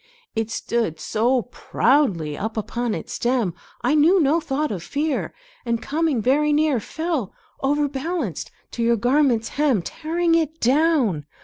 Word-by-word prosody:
It 225 Hz, 0 st, -1 dB
stood 225 Hz, -7 st, -2 dB
so 235 Hz, +8 st, +1 dB
proudly 225 Hz, -, +1 dB
up 220 Hz, +5 st, -4 dB
upon 235 Hz, +1 st, -2 dB
its -, -, -6 dB
stem, 240 Hz, -7 st, 0 dB, 0.3 s
I 250 Hz, -, +2 dB
knew 320 Hz, +6 st, +5 dB
no 310 Hz, +1 st, +3 dB
thought 300 Hz, -2 st, -2 dB
of 190 Hz, -5 st, -4 dB
fear, 290 Hz, -, -2 dB, 0.3 s
And 235 Hz, -1 st, -1 dB
coming 295 Hz, -4 st, 0 dB
very 295 Hz, +5 st, +3 dB
near 295 Hz, -3 st, +2 dB
Fell, 315 Hz, -, -3 dB, 0.3 s
overbalanced, 285 Hz, -, -1 dB, 0.2 s
to 235 Hz, -, -4 dB
your 235 Hz, 0 st, +3 dB
garment's 245 Hz, -1 st, +2 dB
hem, 275 Hz, -, +1 dB
Tearing 330 Hz, -, -1 dB
it 320 Hz, -1 st, +1 dB
down. 255 Hz, -, +2 dB
265 Hz, 140 wpm, -22 LUFS, 225-305 Hz, 0.3 s, knew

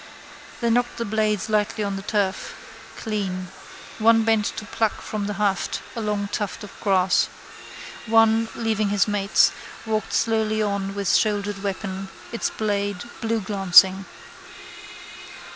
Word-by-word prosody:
Then 235 Hz, -1 st, +2 dB
knocked 245 Hz, 0 st, 0 dB
the 235 Hz, -, -2 dB
blades 215 Hz, -1 st, 0 dB
lightly 215 Hz, 0 st, 0 dB
on 200 Hz, -1 st, -2 dB
the 195 Hz, -, -5 dB
turf: 200 Hz, -1 st, -2 dB, 0.4 s
clean. 190 Hz, -5 st, -3 dB, 0.5 s
One 225 Hz, +1 st, +5 dB
bent 220 Hz, -2 st, +2 dB
to 220 Hz, -, -5 dB
pluck 220 Hz, -1 st, -1 dB
from 210 Hz, -2 st, -4 dB
the 210 Hz, -, -3 dB
haft 200 Hz, -1 st, -1 dB
a 230 Hz, -, -3 dB
long 210 Hz, -1 st, -1 dB
tuft 205 Hz, +2 st, -3 dB
of 205 Hz, -, -9 dB
grass. 190 Hz, -3 st, +3 dB, 0.8 s
One, 225 Hz, 0 st, +4 dB
leaving 220 Hz, -2 st, 0 dB
his 205 Hz, +1 st, +2 dB
mates, 205 Hz, -1 st, +3 dB, 0.3 s
walked 215 Hz, -1 st, -2 dB
slowly 220 Hz, -1 st, +1 dB
on 200 Hz, -2 st, -1 dB
with 200 Hz, -2 st, 0 dB
shouldered 205 Hz, -2 st, +1 dB
weapon, 195 Hz, -1 st, -4 dB, 0.2 s
its 230 Hz, -, -1 dB
blade 205 Hz, -3 st, -2 dB, 0.2 s
blueglancing. 195 Hz, -3 st, +4 dB
210 Hz, 130 wpm, -23 LUFS, 195-220 Hz, 0.8 s, One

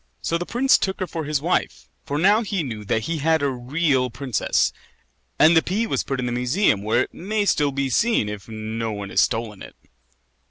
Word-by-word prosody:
So 170 Hz, -, 0 dB
the 175 Hz, -, -5 dB
prince 260 Hz, +3 st, +3 dB
took 190 Hz, +1 st, -2 dB
her 185 Hz, -, -1 dB
for 165 Hz, -3 st, -5 dB
his 150 Hz, -1 st, -1 dB
wife, 65 Hz, -, -1 dB, 0.2 s
for 145 Hz, -, -2 dB
now 200 Hz, +7 st, +4 dB
he 200 Hz, -6 st, -2 dB
knew 110 Hz, -6 st, -6 dB
that 110 Hz, +2 st, 0 dB
he 165 Hz, +3 st, -2 dB
had 160 Hz, +1 st, +2 dB
a 140 Hz, -, +2 dB
real 130 Hz, +1 st, 0 dB
princess; 130 Hz, 0 st, 0 dB, 0.6 s
and 160 Hz, +2 st, +6 dB
the 160 Hz, -, +6 dB
pea 205 Hz, +8 st, -1 dB
was -, -, -1 dB
put 135 Hz, -2 st, -3 dB
in 125 Hz, -, -2 dB
the 120 Hz, -, -2 dB
museum, 125 Hz, -, +1 dB
where 110 Hz, +4 st, +2 dB
it -, -, -11 dB
may 205 Hz, +3 st, -2 dB
still 145 Hz, -7 st, +2 dB
be 140 Hz, 0 st, -1 dB
seen, 215 Hz, -, +2 dB
if 105 Hz, 0 st, -7 dB
no 110 Hz, +1 st, -4 dB
one 100 Hz, -2 st, -6 dB
has -, -, +3 dB
stolen 110 Hz, -3 st, -1 dB
it. -, -, -11 dB
140 Hz, 215 wpm, -22 LUFS, 115-175 Hz, 0.6 s, and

